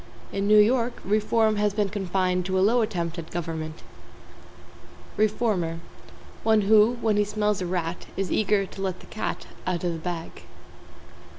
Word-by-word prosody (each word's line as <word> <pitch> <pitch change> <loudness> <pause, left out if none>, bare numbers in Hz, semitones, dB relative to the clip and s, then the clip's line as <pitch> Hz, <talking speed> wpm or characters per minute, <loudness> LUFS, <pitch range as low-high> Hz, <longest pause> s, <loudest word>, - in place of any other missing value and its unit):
In 200 0 -1
New 210 0 +6
York, 235 +3 +3
reform 215 +1 +2
has 205 -1 +1
been 205 -2 +1
confined 185 -2 0
to 190 0 0
a - - +3
Low 230 +5 +4
attempt 170 -5 -2
at 165 - -8
government. 160 -2 -5 1.3
=REFORMER= 205 -6 0 0.6
One 220 -1 +3
who, 215 +3 +5
when 215 -2 +2
he 210 - +4
smells 210 -1 -1
a 180 - -2
rat, 175 -1 -3
is 195 -1 -2
eager 205 -1 +2
to 195 - -10
let 190 -2 -2
the - - -14
cat 215 - -4 0.2
out 180 -1 -1
of 175 -1 0
the 165 - -5
bag. 170 0 -6
195 Hz, 165 wpm, -25 LUFS, 180-215 Hz, 1.3 s, New